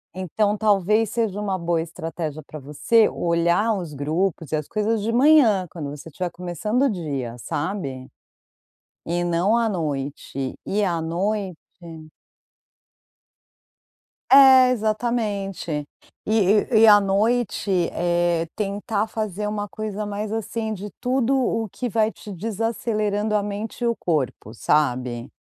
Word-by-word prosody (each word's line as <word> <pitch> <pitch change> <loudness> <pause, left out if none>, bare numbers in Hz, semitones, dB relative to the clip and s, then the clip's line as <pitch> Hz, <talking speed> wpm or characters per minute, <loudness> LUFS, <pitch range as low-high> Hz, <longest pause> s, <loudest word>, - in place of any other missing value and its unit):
Então 205 +3 0
talvez 210 +1 +2
seja 220 -4 -1
uma 195 -2 -1
boa 170 -1 0
estratégia 160 -2 -5
pra 155 - -9
você, 150 - +2
olhar 170 +6 +1
os 170 -5 -6
grupos, 160 +3 -2
e - - +1
as 150 -1 -3
coisas, 215 0 0
de 230 - 0
manhã, 240 - +5
quando 150 -4 -6
você 150 +3 -11
tiver 175 +3 -4
começando 180 - -2
o 275 - +3
dia, 140 - -4
sabe, 140 - -4 1.0
e 175 +1 -1
não 175 +6 +2
à 230 -1 +1
noite. 140 -6 -4
E 205 +1 0
à 170 -4 0
noite 185 +2 -2 2.7
É, 265 -2 +8
exatamente. 215 -5 -2 0.5
E 215 - -2 0.4
e 220 - +5
e - - +9
à 205 -1 +8
noite, 205 +2 0 0.2
eh, 175 -1 +1
tentar 205 +1 -2
fazer 210 -2 -3
uma 205 -1 -3
coisa 215 0 -5
mais 205 +1 -4
assim, 225 0 -3
de 205 0 -6
tudo 255 +1 +1
o 225 -4 0
que 250 +6 -4
vai 220 -1 +1
te 210 - -10
desacelerando 215 +1 -1
a 205 - +2
mente 210 +4 -5
e - - +2
o 235 -2 +1
corpo, 135 - -2
sabe. 125 -3 0
200 Hz, 135 wpm, -23 LUFS, 170-220 Hz, 2.7 s, e